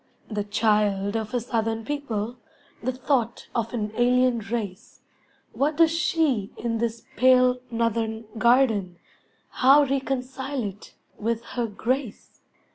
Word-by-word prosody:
The 210 -1 -1
child 210 -1 +1
of 220 -1 -2
a 245 - 0
southern 225 -1 -2
people, 240 -5 -3 0.4
The 255 - -1
thought 250 -2 -1
of 230 -1 -1
an 215 -3 -2
alien 250 0 +3
race, 205 -3 -5 0.5
What 290 +2 0
does 330 -1 +5
she 310 - +1
in 230 -1 -2
this 230 0 -2
pale, 255 0 +5
northern 230 -1 -1
garden, 225 -7 +3 0.6
How 275 +3 +7
reconcile 265 0 -2
it 205 0 -8 0.2
with 230 +1 -1
her 240 -2 -1
grace? 235 +3 -4
235 Hz, 120 wpm, -25 LUFS, 220-255 Hz, 0.6 s, How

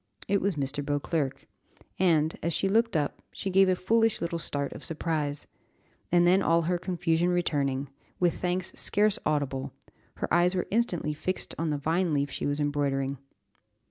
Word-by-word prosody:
It 200 0 +2
was 195 -2 0
Mr. 145 0 -2
Beauclerc, 145 -1 -2 0.5
and, 160 -4 +3
as 170 +1 -1
she 195 - +1
looked 225 -1 +2
up, 145 -2 -2
she 195 - -4
gave 190 0 +5
a 185 - +3
foolish 225 +4 +2
little 170 0 -2
start 140 -3 -3
of - - -10
surprise, 155 -3 -2 0.7
and 175 0 +5
then 185 +2 +5
all 165 0 +3
her 175 +2 0
confusion 175 -1 0
returning, 145 -6 0 0.3
with 175 -2 +1
thanks 180 0 0
scarce 210 0 +2
audible, 140 -3 -1 0.4
her - - -3
eyes 175 +2 +4
were 180 - 0
instantly 185 -9 0
fixed 185 +5 -3
on 165 -1 0
the 150 - 0
vine 165 +3 0
leaf 140 0 0
she - - -3
was 145 +1 -1
embroidering. 140 -2 0
165 Hz, 170 wpm, -28 LUFS, 145-185 Hz, 0.7 s, gave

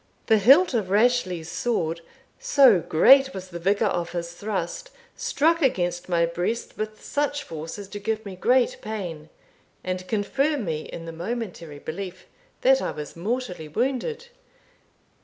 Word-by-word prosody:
The 220 -2 +4
hilt 275 - +6
of 215 -6 0
Rashleigh's 200 -6 +2
sword, 170 -9 -1 0.4
so 260 -9 +5
great 270 - +5
was 185 -1 -7
the 170 -1 -7
vigour 200 +4 +2
of 170 -1 -3
his 170 -1 -3
thrust, 220 - -4 0.3
struck 330 +3 +1
against 175 - 0
my 170 -1 +3
breast 175 +7 -3
with 215 0 -6
such 290 0 -1
force 160 - -7
as 200 -1 -8
to 205 - -6
give 220 +1 -2
me 195 -2 -7
great 250 +6 +2
pain, 175 -8 -6 0.5
and 185 0 -4
confirm 270 +6 0
me 155 -2 -3
in 165 - -7
the 165 - -6
momentary 175 -4 -5
belief 185 +5 -7 0.4
that - - +5
I - - -1
was 150 -1 -7
mortally 185 -3 -3
wounded. 270 - -2
200 Hz, 150 wpm, -25 LUFS, 170-250 Hz, 0.5 s, hilt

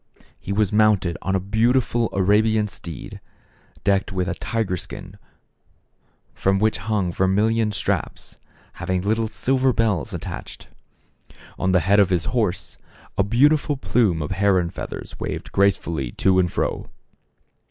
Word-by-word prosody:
He - - -6
was 105 0 +1
mounted 105 -5 +3
on 95 - -1
a - - +2
beautiful 115 +4 +1
Arabian 105 +3 +2
steed, 85 -7 -9 0.6
decked 100 -1 +1
with 90 -1 -1
a 95 - -1
tiger 105 +1 -2
skin 90 - -9 1.1
from 95 0 +1
which 110 +2 +1
hung 100 -3 -1
vermilion 105 +5 +1
straps, 100 - -3 0.4
having 95 -1 -2
little 110 +2 +1
silver 130 +3 +1
bells 110 -7 0
attached. - - -7 0.9
On 95 - +1
the 90 -2 +4
head 100 +5 +3
of 100 -2 +4
his 90 -3 0
horse, 100 -7 -2 0.4
a - - +2
beautiful 145 +7 +3
plume 105 - +1
of 75 - -5
heron 95 -3 +2
feathers - - -7
waved - - -5
grace 100 0 +3
fully 70 -8 -4
to 95 -1 +2
and 90 -2 +1
fro. - - -2
100 Hz, 140 wpm, -22 LUFS, 95-110 Hz, 1.1 s, the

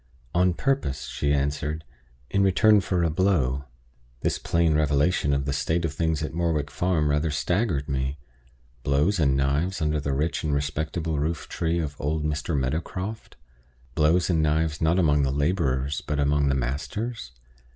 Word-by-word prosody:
"On 90 0 +3
purpose," 135 - -1
she 70 - -1
answered. 75 +2 -1 0.5
"In 100 - +2
return 100 +2 +5
for 90 -2 0
a 85 - +1
blow." 75 -7 +1 0.6
This - - 0
plain 85 -1 +2
revelation 75 +1 +2
of 70 -1 0
the 70 - -1
state 85 +4 0
of 80 - -2
things 80 -2 0
at 75 - -4
Morwick 80 -3 -1
Farm 85 -4 +1
rather 75 +2 +1
staggered 80 0 0
me 65 0 -2 0.6
blows 75 +9 +1
and 70 -4 +3
knives 70 +8 0
under 75 -1 0
the 70 -1 -2
rich 75 +5 -1
and 75 -2 0
respectable 75 +2 -2
roof 80 +2 -2
tree 85 0 -1
of 75 -4 -3
old 75 +2 -1
Mr. 75 +1 -1
Meadowcroft 85 - -3 0.6
blows 80 +5 +3
and 80 -3 +2
knives, 80 0 0
not 80 +2 +3
among 75 -5 +3
the 70 - +1
laborers, 70 -2 0
but 75 -1 -1
among 70 0 +2
the 70 - +2
masters! 70 - -3
75 Hz, 160 wpm, -25 LUFS, 70-85 Hz, 0.6 s, return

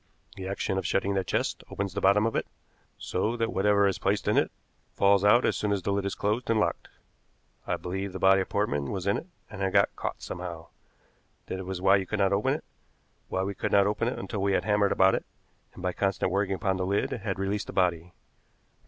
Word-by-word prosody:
The 95 -1 -6
action 95 0 -1
of 95 - -3
shutting 95 +2 +1
that 95 -1 -1
chest - - -1
opens 100 -2 -3
the 100 - -3
bottom 100 +3 +4
of 115 - -1
it, - - -1 0.5
so 110 +6 -2
that 115 0 -1
whatever 100 +1 +3
is 95 - -1
placed 100 +1 0
in - - +3
it - - +3 0.5
falls 100 0 +4
out 105 +4 +5
as - - +2
soon 105 - -1
as 100 -3 0
the 100 - 0
lid 100 0 -1
is 100 - -2
closed 110 +5 -1
and 115 -1 +3
locked. 105 - -1 0.8
I - - 0
believe 95 +2 -4
the - - -5
body 95 0 +5
of 95 - -4
Portman 75 -9 -1
was 95 -2 -4
in 100 - +2
it - - -7 0.2
and 100 - -9
had 95 -1 0
got 100 -1 +3
caught - - -5
somehow 85 -3 -6 0.8
that 95 0 -5
was 95 -1 -4
why 95 +1 +6
you 95 -1 -3
could 105 - -2
not 100 -1 +2
open 100 +2 +2
it, - - -7 0.7
why 95 - -1
we 100 +1 -2
could - - -3
not 100 -1 +5
open 105 +3 0
it 125 - -2
until 105 -4 -4
we 100 0 +1
had - - +1
hammered 105 -1 +3
it - - +1
about, 95 0 +4 0.5
and 90 - -10
by 90 -1 0
constant 95 -1 0
working 100 0 0
upon 95 +1 -1
the 95 - -1
lid 100 +1 0
had 100 -4 -3
released 100 +2 -2
the - - -7
body. 90 -2 +1
100 Hz, 235 wpm, -28 LUFS, 95-100 Hz, 0.8 s, why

